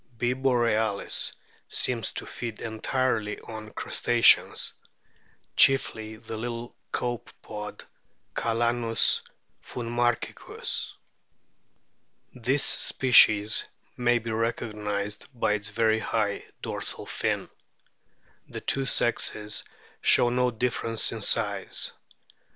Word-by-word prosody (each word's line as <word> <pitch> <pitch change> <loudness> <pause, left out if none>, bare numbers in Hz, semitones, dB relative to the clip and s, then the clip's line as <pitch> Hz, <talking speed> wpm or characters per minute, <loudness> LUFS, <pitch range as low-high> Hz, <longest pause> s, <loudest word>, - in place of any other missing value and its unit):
B. 120 +2 +1
borealis 115 -5 +1 0.4
seems 120 -3 +1
to - - -5
feed 115 -3 -6
entirely 110 -1 -1
on 110 -1 -8
Crustaceans, 120 +2 +3 0.8
chiefly 110 -5 +3
the 110 0 -8
little 120 +1 -5 0.2
Copepod 110 -3 -5 0.5
Calanus 115 0 +2 0.4
finmarchicus. 120 0 -2 1.4
This 130 +3 +1
species 110 -5 +5 0.3
may 120 0 +2
be 115 -1 -4
recognised 105 -2 -2
by 105 - +2
its 105 0 -3
very 110 0 +2
high 105 -2 -1 0.2
dorsal - - -4
fin. - - -2 1.0
The - - -7
two 135 0 0
sexes 105 -4 0 0.4
show 120 - +5
no 125 0 +2
difference 115 -1 0
in - - -6
size. - - +1
115 Hz, 90 wpm, -27 LUFS, 110-120 Hz, 1.4 s, species